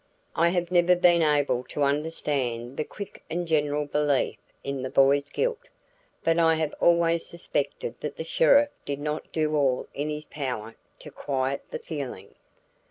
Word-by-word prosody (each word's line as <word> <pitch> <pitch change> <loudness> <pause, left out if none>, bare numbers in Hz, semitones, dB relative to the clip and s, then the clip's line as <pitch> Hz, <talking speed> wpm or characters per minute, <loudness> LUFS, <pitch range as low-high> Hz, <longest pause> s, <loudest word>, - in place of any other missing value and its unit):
I 170 +1 +4
have 175 0 -1
never 180 0 +5
been 175 -1 +4
able 145 -5 +2
to 145 - -2
understand 140 -4 -1
the - - 0
quick 200 +5 -9
and 175 +1 -2
general 150 -2 +1
belief 145 -2 0 0.2
in 140 -1 -3
the 130 - -3
boy's 140 +1 +3
guilt, 480 -1 -1 0.6
but 165 0 +2
I 165 -1 +5
have 160 -1 -1
always 170 -1 +3
suspected 170 - -3
that - - -5
the - - -3
sheriff 290 - +4
did 140 -1 -4
not 150 +1 -4
do 155 -1 0
all 135 -4 +1
in 145 +2 -3
his 150 0 -4
power 125 -6 -4 0.2
to - - -11
quiet 135 0 -2
the - - -4
feeling. 135 - -7
150 Hz, 165 wpm, -26 LUFS, 140-170 Hz, 0.6 s, never